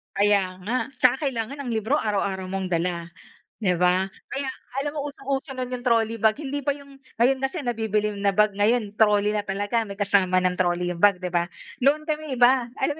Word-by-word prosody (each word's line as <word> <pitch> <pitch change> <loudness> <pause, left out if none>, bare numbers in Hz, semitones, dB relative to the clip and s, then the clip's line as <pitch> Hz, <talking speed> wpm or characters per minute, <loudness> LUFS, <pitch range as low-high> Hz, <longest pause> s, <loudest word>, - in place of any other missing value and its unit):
Kaya 200 -2 +2
nga. 235 +6 0 0.2
Tsaka 255 +4 +3
kailangan 245 +1 -3
ang 260 -4 -4
libro 220 +6 +1
araw-araw 195 -3 -1
mong 190 0 -3
dala, 170 0 -1 0.5
'di 180 -3 +2
ba? 180 +1 +3 0.2
Kaya 275 -1 -3 0.3
alam 290 +1 -2
mo, 290 -1 -2
usong-uso 275 0 -4
no'n 255 -1 -3
'yong 250 0 -4
trolley 230 -1 +2
bag. 220 0 +4
Hindi 285 -1 -3
pa 285 +1 0
'yong 280 -1 -15 0.2
ngayon 260 +3 +4
kasi 270 +4 -2
nabibili 215 -3 0
na 200 0 +1
bag 210 +1 +4
ngayon 210 0 +1
trolley 210 -1 +4
na 210 -1 -1
talaga, 205 +4 -1
may 200 - -7
kasama 190 -2 +3
ng 180 0 +1
trolley 175 0 +1
'yong 170 - -9
bag, 205 -1 +6
'di 180 - -2
ba? 175 0 +1 0.4
Noon 300 +3 +3
kami 305 -2 -3
iba. 245 0 +4
Alam 285 +2 +1
220 Hz, 200 wpm, -24 LUFS, 195-265 Hz, 0.5 s, bag